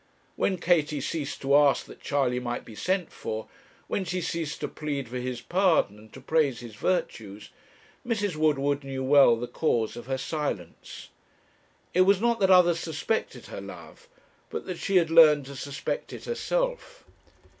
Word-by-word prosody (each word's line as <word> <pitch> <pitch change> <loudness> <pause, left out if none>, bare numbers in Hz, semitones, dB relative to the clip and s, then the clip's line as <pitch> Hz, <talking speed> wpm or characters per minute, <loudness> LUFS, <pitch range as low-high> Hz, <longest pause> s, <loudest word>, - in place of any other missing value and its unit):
When 190 - 0
Katie 155 -4 +1
ceased 140 +1 -4
to 140 +1 +3
ask 145 -1 +4
that - - -14
Charley 130 -4 0
might 120 -1 -4
be 110 - -11
sent 180 - -1
for, 110 0 -5 0.4
when 195 - -2
she 180 +1 -3
ceased 165 -3 -3
to - - -1
plead 145 -4 -4
for 125 +2 -5
his 125 -1 -4
pardon 175 - +2
and 110 0 -17
to - - -10
praise 140 -2 +1
his 120 -2 -9
virtues, 105 - -3 0.5
Mrs. 205 -7 -1
Woodward 145 -2 +1
knew 135 -1 -4
well 135 -3 +6
the 115 +1 -4
cause 120 -5 -1
of 120 0 -9
her 135 0 -1
silence. 135 - -5 0.8
It 185 - +4
was 190 +1 +5
not 235 +1 +1
that 190 -2 +3
others 175 -2 +6
suspected 165 +8 -3
her - - -8
love, 480 +1 -12 0.4
but - - -5
that 180 -3 -5
she 195 - -1
had 170 -3 +4
learned 155 -4 +7
to 140 +1 -9
suspect 140 +1 -4
it - - -9
herself. - - -2
150 Hz, 170 wpm, -27 LUFS, 130-180 Hz, 0.8 s, learned